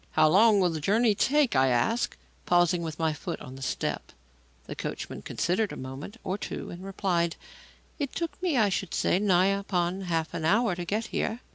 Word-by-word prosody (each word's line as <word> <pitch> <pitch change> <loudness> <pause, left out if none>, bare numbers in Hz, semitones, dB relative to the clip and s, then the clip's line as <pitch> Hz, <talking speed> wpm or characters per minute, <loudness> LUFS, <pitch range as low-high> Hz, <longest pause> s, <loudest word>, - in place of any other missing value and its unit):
"How - - +5
long 210 +4 +6
will 180 -2 +3
the 160 -2 -4
journey 220 +6 +3
take?" 280 - +2
I 130 0 +4
asked, 130 - +1 0.3
pausing 175 0 +3
with 160 -2 -5
my 160 -1 +1
foot 150 - -5
on 130 - -9
the 135 - -11
step. 130 - -3 0.5
The - - -7
coachman - - -5
considered 190 +5 -1
a - - -7
moment 135 - -7
or 190 +2 -3
two - - -5
and 175 +2 -9
replied: 180 -3 0 0.6
"It 280 -3 -3
took 335 +1 -4
me, 345 -7 +1
I 215 -3 +4
should 190 -2 -2
say, 180 - +2
nigh 195 -1 +3
upon 185 -2 -1
half 165 -2 -1
an 160 - -4
hour 210 +5 +3
to 175 0 -5
get 215 +5 -1
here." 230 +3 -1
185 Hz, 200 wpm, -28 LUFS, 165-215 Hz, 0.6 s, long